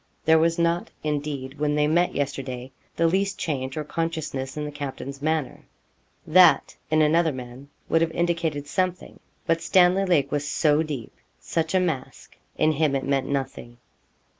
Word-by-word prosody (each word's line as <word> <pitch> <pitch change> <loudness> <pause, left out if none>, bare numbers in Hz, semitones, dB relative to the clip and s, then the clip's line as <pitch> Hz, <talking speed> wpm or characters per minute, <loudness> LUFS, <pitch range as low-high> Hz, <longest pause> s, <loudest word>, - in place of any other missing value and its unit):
There 160 0 +6
was 165 +1 +2
not, 170 0 +1
indeed, 145 -2 -3
when 150 0 +1
they 150 0 +3
met 170 +4 +2
yesterday, 135 -2 -4 0.2
the 165 - +2
least 195 +4 +1
change 135 -3 -3
or 155 - -1
consciousness 155 -4 -3
in 150 - -2
the 150 - -5
captain's 140 -1 -6
manner. 155 -3 -1 0.6
That, 170 -3 +5
in 155 0 +4
another 160 +2 +3
man, 130 +1 -9 0.2
would 165 - +2
have 165 - +2
indicated 165 -4 -1
something; 180 +4 -2 0.3
but 165 0 +1
Stanley 185 +1 +4
Lake 150 -7 +2
was 145 0 -1
so 150 -1 +3
deep 145 -7 -5 0.3
such 160 +1 -2
a - - +5
mask 160 -8 -4 0.2
in 155 - +3
him 150 -2 +1
it 135 - -2
meant 135 -1 0
nothing. 135 -3 -4
150 Hz, 165 wpm, -25 LUFS, 140-165 Hz, 0.6 s, There